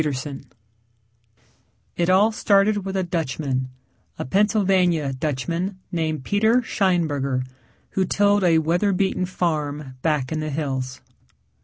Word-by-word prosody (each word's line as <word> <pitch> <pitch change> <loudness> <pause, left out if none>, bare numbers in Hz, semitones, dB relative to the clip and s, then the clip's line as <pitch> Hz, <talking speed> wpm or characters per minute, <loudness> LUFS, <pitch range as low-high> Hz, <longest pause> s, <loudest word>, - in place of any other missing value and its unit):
] - - -1 1.9
It 175 0 0
all 200 +4 +5
started 205 -1 +2
with 195 0 -3
a 190 - +1
Dutchman, 140 -6 -2 0.5
a - - -4
Pennsylvania 185 - +2
Dutchman 155 +8 -2
named 160 -4 -2
Peter 220 +4 +3
Scheinberger, 145 - 0 0.5
who 190 - +1
tilled 205 +1 +2
a 170 -2 +4
weather 175 +6 +1
beaten 185 -1 0
farm 150 -6 -2
back 150 -5 0
in 155 - -1
the 155 0 -3
hills. 135 -3 -3
170 Hz, 120 wpm, -23 LUFS, 145-195 Hz, 1.9 s, all